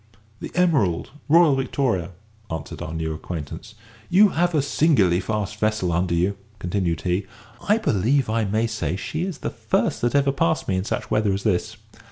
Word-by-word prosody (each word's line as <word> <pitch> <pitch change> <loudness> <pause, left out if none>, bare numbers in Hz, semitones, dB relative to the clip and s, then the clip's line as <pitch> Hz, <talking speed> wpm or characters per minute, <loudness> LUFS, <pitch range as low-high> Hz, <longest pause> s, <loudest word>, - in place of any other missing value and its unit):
"The - - -6
Emerald, 135 - +2 0.2
Royal 165 -1 +6
Victoria," 125 - -1 0.4
answered 80 - -6
our 80 - -5
new 80 -1 -3
acquaintance. 85 +7 -7 0.3
"You 200 +3 +6
have 175 -1 +1
a 150 - +4
singularly 130 - +3
fast 105 +1 -3
vessel 105 -4 0
under 85 +1 +1
you," 90 +3 0 0.2
continued 90 -3 -1
he; 95 +2 -1 0.4
"I 210 - +5
believe 135 - +1
I 110 0 0
may 110 +3 +1
say 100 -8 -2
she 155 - -4
is 185 -4 -4
the - - -1
first - - -1
that 120 +3 +1
ever 140 -1 +3
passed 110 -11 0
me 95 - +1
in 95 +1 -1
such - - -3
weather 105 -1 +2
as 100 - -3
this. 110 +2 0
105 Hz, 180 wpm, -23 LUFS, 90-140 Hz, 0.4 s, Royal